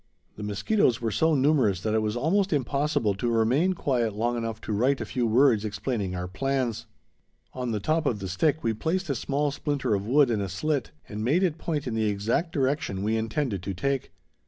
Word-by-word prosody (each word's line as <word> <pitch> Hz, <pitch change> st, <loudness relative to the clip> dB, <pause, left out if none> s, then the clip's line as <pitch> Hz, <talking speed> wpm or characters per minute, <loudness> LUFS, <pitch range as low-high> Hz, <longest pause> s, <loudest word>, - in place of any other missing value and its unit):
The -, -, -9 dB
mosquitoes 115 Hz, -, +1 dB
were 115 Hz, -2 st, -1 dB
so 160 Hz, +7 st, +2 dB
numerous 135 Hz, -, +3 dB
that 110 Hz, +1 st, -1 dB
it 110 Hz, -, +2 dB
was 105 Hz, +1 st, -1 dB
almost 185 Hz, +10 st, +1 dB
impossible 140 Hz, -4 st, +1 dB
to 110 Hz, +5 st, -2 dB
remain 125 Hz, +11 st, +2 dB
quiet 125 Hz, -, 0 dB
long 120 Hz, +3 st, 0 dB
enough 115 Hz, -2 st, -3 dB
to 110 Hz, -, -4 dB
write 130 Hz, +6 st, +2 dB
a -, -, -3 dB
few 125 Hz, -3 st, -1 dB
words 115 Hz, -1 st, +4 dB
explaining 105 Hz, -2 st, -3 dB
our 90 Hz, 0 st, -3 dB
plans. 130 Hz, +3 st, -2 dB, 0.7 s
On 125 Hz, -1 st, -3 dB
the 110 Hz, -2 st, -1 dB
top 155 Hz, +7 st, 0 dB
of 115 Hz, -, +1 dB
the 95 Hz, -1 st, -5 dB
stick 150 Hz, -, 0 dB
we 115 Hz, -, +1 dB
placed 165 Hz, -, -1 dB
a -, -, +2 dB
small 145 Hz, +4 st, -1 dB
splinter 145 Hz, -4 st, -1 dB
of 100 Hz, 0 st, -1 dB
wood 135 Hz, 0 st, +4 dB
in 110 Hz, -3 st, 0 dB
a 100 Hz, -, -3 dB
slit, 135 Hz, -, -1 dB, 0.2 s
and 105 Hz, +1 st, -5 dB
made 155 Hz, +11 st, +2 dB
it 170 Hz, -4 st, 0 dB
point 150 Hz, -4 st, -2 dB
in 125 Hz, -, -3 dB
the 110 Hz, -1 st, +1 dB
exact 110 Hz, -, -1 dB
direction 130 Hz, -8 st, -1 dB
we 110 Hz, +2 st, +1 dB
intended 110 Hz, -, -1 dB
to 95 Hz, +1 st, -4 dB
take. 135 Hz, +8 st, -2 dB
120 Hz, 210 wpm, -26 LUFS, 105-145 Hz, 0.7 s, words